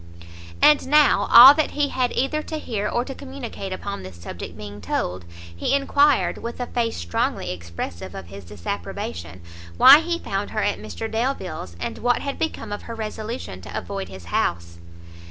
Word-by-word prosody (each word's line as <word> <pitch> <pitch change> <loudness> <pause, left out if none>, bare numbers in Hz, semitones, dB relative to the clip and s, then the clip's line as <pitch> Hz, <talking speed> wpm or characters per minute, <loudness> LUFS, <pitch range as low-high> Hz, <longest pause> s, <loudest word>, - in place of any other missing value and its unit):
And 295 -3 +6
now, 300 +1 +4
all 260 +4 +12
that 310 0 0
he 290 -1 +2
had 250 -2 0
either 290 +4 0
to 315 +1 -5
hear 210 -8 -3
or 240 - -1
to 270 - -6
communicate 260 -8 -7
upon 200 +1 -5
this 95 -1 -10
subject 85 +2 -8
being 105 -1 -9
told, 90 -2 -3 0.3
he 85 - 0
enquired, 280 0 +2
with 235 +1 -6
a 245 - -2
face 235 -2 -2
strongly 85 +1 -2
expressive 85 +1 -7
of 95 - -7
his 100 +3 -11
disapprobation, 85 -2 -6 0.4
why 280 +3 +10
he 340 +1 -2
found - - -3
her - - -2
at - - 0
Mr 225 - -5
Delvile's, 220 - -3
and - - -5
what 245 0 +1
had 280 -1 -4
become 225 -9 -3
of 205 - -4
her 230 - -8
resolution 215 - -6
to - - -7
avoid 95 +1 -5
his 95 -2 -11
house? 85 0 -2
210 Hz, 175 wpm, -23 LUFS, -, 0.4 s, all